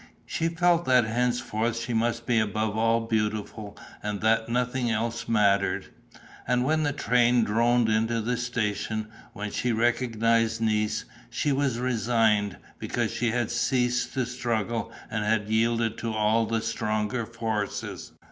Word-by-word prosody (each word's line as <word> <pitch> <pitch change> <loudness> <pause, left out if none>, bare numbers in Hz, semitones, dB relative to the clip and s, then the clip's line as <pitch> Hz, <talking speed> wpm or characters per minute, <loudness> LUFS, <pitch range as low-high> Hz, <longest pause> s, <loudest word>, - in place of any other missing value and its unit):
She 165 - -1
felt 170 +1 +2
that 125 -3 +4
henceforth 120 -1 -1
she 115 +1 -3
must 115 +1 0
be 120 -2 +2
above 110 0 -1
all 115 +1 +2
beautiful 105 -1 -3 0.2
and 105 -1 -3
that 110 +1 +2
nothing 125 +1 0
else 115 +1 -2
mattered. 100 -3 +2 0.6
And 125 0 +2
when 155 +3 +2
the 145 -1 +1
train 125 -3 +3
droned 115 +2 +2
into 110 +1 +1
the 120 +3 -1
station, 110 -3 -2 0.2
when 105 0 -5
she 125 - -1
recognized 115 -1 +1
Nice, 110 -1 0 0.2
she 145 +4 -1
was 135 -3 +1
resigned, 115 -4 +1 0.2
because - - -2
she 120 - 0
had 120 0 -1
ceased 125 -1 0
to 130 -2 +1
struggle 115 -2 -2 0.2
and 105 -1 -1
had 105 0 0
yielded 115 0 +1
to 115 - -2
all 110 +1 +2
the 115 -1 0
stronger 110 0 -2
forces. 110 -3 -4
115 Hz, 145 wpm, -26 LUFS, 110-120 Hz, 0.6 s, that